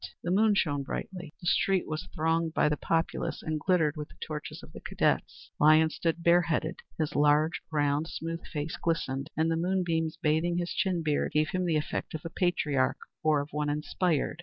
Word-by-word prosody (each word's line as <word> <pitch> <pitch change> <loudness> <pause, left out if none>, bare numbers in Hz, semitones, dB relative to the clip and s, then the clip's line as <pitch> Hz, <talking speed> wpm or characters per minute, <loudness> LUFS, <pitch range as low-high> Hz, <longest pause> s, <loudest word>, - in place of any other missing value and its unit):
The 175 - -1
moon 210 +2 +4
shone 145 -6 +1
brightly. 175 +3 -6
The - - -9
street 190 +1 +2
was 155 +4 -4
thronged 165 0 0
by 150 - +3
the 150 - +1
populace, 165 +2 -1
and 155 -1 -2
glittered 160 -3 +2
with 150 -1 -5
the - - -17
torches 150 -2 -6
of - - -13
the - - -8
cadets. - - -1
Lyons 155 +1 +5
stood 170 0 -1
bareheaded. 170 -2 +2 0.2
His 155 -2 -2
large, 150 +3 +3
round, 145 0 +1
smooth 165 0 -5
face 150 +1 -4
glistened, 140 -5 -1
and 160 +1 +2
the 165 - +1
moonbeams, 170 -2 0
bathing 160 +3 +1
his 175 0 -2
chin 185 -5 0
beard, 150 -2 0
gave 155 0 +2
him 185 -1 -1
the 160 -2 +2
effect 150 +1 -3
of 155 - -7
a 165 - -5
patriarch, 150 -8 +1 0.2
or 155 -2 +3
of 145 - -7
one 150 0 -1
inspired. 150 +1 0
160 Hz, 190 wpm, -29 LUFS, 150-170 Hz, 0.2 s, Lyons